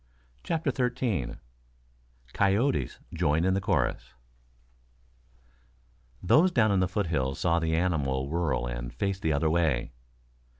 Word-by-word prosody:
CHAPTER 160 Hz, -4 st, -1 dB
XIII 125 Hz, -, -1 dB, 1.0 s
COYOTES 100 Hz, -, +1 dB, 0.2 s
JOIN 80 Hz, -1 st, +1 dB
IN 95 Hz, -, +2 dB
THE 95 Hz, -, 0 dB
CHORUS 95 Hz, -, -1 dB, 2.1 s
Those 165 Hz, -, +4 dB
down 110 Hz, -8 st, +3 dB
in 100 Hz, -, +2 dB
the 95 Hz, -, +2 dB
foothills 80 Hz, -9 st, -1 dB
saw 85 Hz, -1 st, +1 dB
the 80 Hz, -1 st, 0 dB
animal 70 Hz, -7 st, 0 dB
whirl 80 Hz, -5 st, -1 dB
and -, -, -5 dB
face 100 Hz, -1 st, -2 dB
the 80 Hz, -, 0 dB
other 75 Hz, +2 st, +1 dB
way. 80 Hz, -9 st, +1 dB
85 Hz, 120 wpm, -28 LUFS, 70-100 Hz, 2.1 s, Those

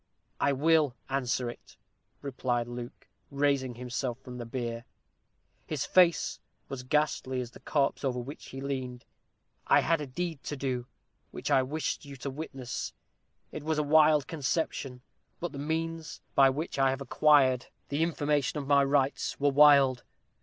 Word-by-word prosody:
"I 140 Hz, -, +3 dB
will 150 Hz, -1 st, +3 dB
answer 125 Hz, -2 st, 0 dB
it," 120 Hz, -, -10 dB, 0.5 s
replied 125 Hz, -3 st, -1 dB
Luke, 120 Hz, +2 st, -8 dB, 0.2 s
raising 140 Hz, -3 st, 0 dB
himself 125 Hz, 0 st, -3 dB
from 125 Hz, -2 st, -9 dB
the 120 Hz, -, -6 dB
bier. 115 Hz, -1 st, -4 dB, 0.8 s
His -, -, -2 dB
face 180 Hz, -2 st, +3 dB, 0.3 s
was 135 Hz, -2 st, -5 dB
ghastly 130 Hz, -1 st, 0 dB
as 120 Hz, -1 st, -5 dB
the -, -, -14 dB
corpse 140 Hz, -1 st, 0 dB
over 130 Hz, -2 st, 0 dB
which 130 Hz, +4 st, -7 dB
he 135 Hz, -, -8 dB
leaned. 130 Hz, -3 st, -4 dB, 0.6 s
"I -, -, +6 dB
had 165 Hz, -1 st, +1 dB
a 145 Hz, -, -4 dB
deed 165 Hz, +1 st, -4 dB
to 145 Hz, -, -4 dB
do, 125 Hz, -2 st, -2 dB, 0.4 s
which -, -, -5 dB
I 130 Hz, -, +5 dB
wished 150 Hz, +5 st, -3 dB
you 140 Hz, -1 st, -9 dB
to 135 Hz, +1 st, -5 dB
witness. 135 Hz, -3 st, -5 dB, 0.6 s
It 155 Hz, -, -6 dB
was 155 Hz, +1 st, -1 dB
a 150 Hz, -, +2 dB
wild 150 Hz, -1 st, +5 dB
conception. 140 Hz, -4 st, -2 dB, 0.4 s
But 175 Hz, -, -3 dB
the 140 Hz, -, -7 dB
means 160 Hz, +2 st, -3 dB
by 135 Hz, -1 st, +6 dB
which 145 Hz, +2 st, -3 dB
I 135 Hz, 0 st, +4 dB
have 135 Hz, +1 st, -2 dB
acquired 135 Hz, -2 st, +4 dB, 0.2 s
the 145 Hz, +2 st, -1 dB
information 150 Hz, -3 st, 0 dB
of 145 Hz, -, -3 dB
my 140 Hz, 0 st, +4 dB
rights 140 Hz, 0 st, 0 dB
were 145 Hz, 0 st, +3 dB
wild. 140 Hz, -3 st, +6 dB
140 Hz, 160 wpm, -29 LUFS, 130-150 Hz, 0.8 s, I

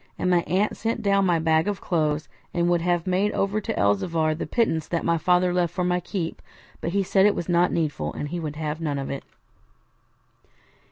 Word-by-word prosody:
and 180 Hz, -, 0 dB
my 175 Hz, -1 st, +4 dB
aunt 190 Hz, +6 st, +1 dB
sent 225 Hz, +1 st, -2 dB
down 200 Hz, -1 st, +3 dB
my 175 Hz, -1 st, +3 dB
bag 160 Hz, +1 st, +2 dB
of 205 Hz, -1 st, -1 dB
clothes, 155 Hz, -3 st, 0 dB, 0.3 s
and 170 Hz, 0 st, +2 dB
would 175 Hz, -1 st, +2 dB
have 175 Hz, -1 st, 0 dB
made 190 Hz, +3 st, +1 dB
over 200 Hz, +2 st, 0 dB
to -, -, -3 dB
Elzevir 155 Hz, -, +1 dB
the 155 Hz, -, -5 dB
pittance 165 Hz, -10 st, 0 dB
that 170 Hz, -, -2 dB
my 170 Hz, -, +3 dB
father 180 Hz, +2 st, +2 dB
left 175 Hz, -2 st, +1 dB
for 180 Hz, +1 st, -2 dB
my 180 Hz, 0 st, +1 dB
keep, 175 Hz, -2 st, -4 dB, 0.4 s
but -, -, -3 dB
he 200 Hz, 0 st, +2 dB
said 190 Hz, +1 st, +4 dB
it 205 Hz, -, +2 dB
was 170 Hz, -, -4 dB
not 175 Hz, 0 st, +3 dB
needful, 145 Hz, -, -1 dB
and 145 Hz, -, -5 dB
he 175 Hz, +2 st, -3 dB
would 150 Hz, -3 st, -4 dB
have 155 Hz, +1 st, -4 dB
none 150 Hz, -3 st, -1 dB
of 135 Hz, -1 st, -4 dB
it. 140 Hz, -, -5 dB
175 Hz, 215 wpm, -25 LUFS, 160-185 Hz, 0.4 s, my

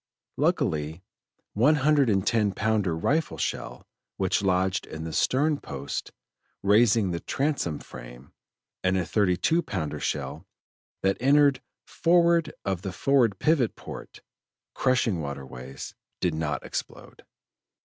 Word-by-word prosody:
Luckily, 110 Hz, -, +1 dB
a 90 Hz, -, -20 dB, 0.6 s
one 145 Hz, +7 st, +5 dB
hundred 145 Hz, -2 st, +3 dB
and 95 Hz, -2 st, +1 dB
ten 105 Hz, -4 st, +2 dB
pounder 105 Hz, -7 st, 0 dB
rifle 150 Hz, -, 0 dB
shell -, -, -4 dB, 0.3 s
which 95 Hz, -1 st, +1 dB
lodged 95 Hz, -1 st, +1 dB
in 80 Hz, 0 st, -7 dB
the 80 Hz, -1 st, -5 dB
stern 145 Hz, +3 st, +2 dB
post, 70 Hz, -1 st, -5 dB, 0.5 s
raising 105 Hz, -1 st, +4 dB
the 85 Hz, -, -2 dB
transom 135 Hz, -, -1 dB
frame, -, -, -12 dB, 0.5 s
and 95 Hz, 0 st, +2 dB
a 90 Hz, -, 0 dB
thirty 90 Hz, +1 st, +2 dB
two 165 Hz, -, +2 dB
pounder 90 Hz, -, -4 dB
shell -, -, -3 dB, 0.6 s
that 95 Hz, 0 st, +2 dB
entered 140 Hz, +1 st, +4 dB, 0.2 s
forward 170 Hz, -1 st, +3 dB
of 95 Hz, -3 st, -1 dB
forward 125 Hz, -6 st, +3 dB
pivot 145 Hz, -, +2 dB
port, -, -, -10 dB, 0.5 s
crushing 125 Hz, -9 st, +1 dB
water 70 Hz, -2 st, -5 dB
ways, 65 Hz, +1 st, -9 dB, 0.3 s
did 90 Hz, -, 0 dB
not 80 Hz, -1 st, -2 dB
explode. -, -, -7 dB
100 Hz, 125 wpm, -26 LUFS, 85-140 Hz, 0.6 s, one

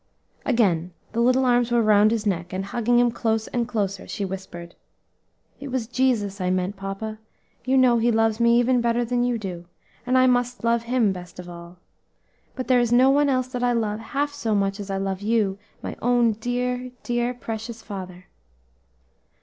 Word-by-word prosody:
Again 180 Hz, -9 st, +1 dB, 0.2 s
the 230 Hz, -, -3 dB
little 255 Hz, +2 st, +3 dB
arms 245 Hz, -1 st, +3 dB
were 240 Hz, -1 st, +2 dB
round 210 Hz, 0 st, +5 dB
his 220 Hz, -1 st, -1 dB
neck, 180 Hz, -3 st, -2 dB
and 190 Hz, +1 st, -3 dB
hugging 240 Hz, +3 st, +1 dB
him 240 Hz, 0 st, +4 dB
close 225 Hz, -1 st, -1 dB
and 240 Hz, -2 st, -1 dB
closer, 200 Hz, -4 st, -2 dB
she 205 Hz, -, -3 dB
whispered, 185 Hz, -3 st, -7 dB, 0.9 s
"It 280 Hz, -, -7 dB
was 255 Hz, -3 st, -2 dB
Jesus 225 Hz, -6 st, 0 dB
I 180 Hz, -, 0 dB
meant, 185 Hz, +2 st, -1 dB
papa; 195 Hz, +3 st, -6 dB, 0.5 s
you 265 Hz, +1 st, +2 dB
know 250 Hz, -2 st, +5 dB
He 235 Hz, +1 st, +2 dB
loves 225 Hz, 0 st, +1 dB
me 235 Hz, 0 st, +4 dB
even 245 Hz, 0 st, +2 dB
better 235 Hz, 0 st, +1 dB
than 245 Hz, +1 st, 0 dB
you 245 Hz, -1 st, 0 dB
do, 180 Hz, -5 st, -6 dB, 0.4 s
and 255 Hz, +1 st, +1 dB
I 255 Hz, -, +5 dB
must 245 Hz, -1 st, +1 dB
love 235 Hz, 0 st, +2 dB
Him 235 Hz, -3 st, +1 dB
best 180 Hz, -2 st, -9 dB
of 180 Hz, -1 st, -8 dB
all; 170 Hz, 0 st, -11 dB, 0.8 s
but 255 Hz, -, -5 dB
there 255 Hz, -1 st, +4 dB
is 240 Hz, -1 st, +1 dB
no 255 Hz, +2 st, +6 dB
one 290 Hz, +1 st, +3 dB
else 255 Hz, -1 st, 0 dB
that 250 Hz, -1 st, -4 dB
I 245 Hz, 0 st, +2 dB
love 215 Hz, -2 st, -1 dB
half 285 Hz, +5 st, -2 dB
so 230 Hz, -7 st, -1 dB
much 195 Hz, 0 st, 0 dB
as 200 Hz, -1 st, -7 dB
I 195 Hz, -, -1 dB
love 195 Hz, 0 st, -3 dB
you, 205 Hz, -2 st, 0 dB, 0.2 s
my -, -, -5 dB
own 240 Hz, -1 st, +3 dB
dear, 250 Hz, +3 st, -2 dB
dear 240 Hz, +1 st, -1 dB
precious 225 Hz, -1 st, -6 dB
father." 185 Hz, -3 st, -8 dB
230 Hz, 190 wpm, -24 LUFS, 195-245 Hz, 0.9 s, no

